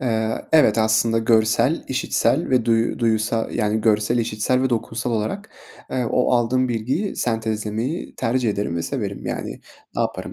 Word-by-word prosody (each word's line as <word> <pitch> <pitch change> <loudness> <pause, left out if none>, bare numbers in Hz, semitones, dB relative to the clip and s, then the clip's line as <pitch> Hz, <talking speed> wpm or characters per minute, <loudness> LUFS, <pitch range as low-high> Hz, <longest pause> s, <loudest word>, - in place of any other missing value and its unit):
Eee, 110 -3 -1
evet. 130 -9 +5
Aslında 110 +1 +2
görsel, 115 +6 +2
işitsel 135 +3 0
ve 125 -3 +3
duyu 115 0 +1
duyusal, 115 -1 0
yani, 110 -1 0
görsel 105 +2 +2
işitsel 115 +3 0
ve 130 - +1
dokunsal 115 +1 -2
olarak, 115 - -3 0.4
eee, 125 -2 -1
o 125 - +2
aldığım 125 +1 +2
bilgiyi 125 - -2
sentezlemeyi 110 +4 -2
tercih 120 0 0
ederim 100 -4 -2
ve 85 - -2
severim. - - -4
Yani, - - -5 0.4
ne - - 0
yaparım - - -4
115 Hz, 150 wpm, -22 LUFS, 110-125 Hz, 0.4 s, evet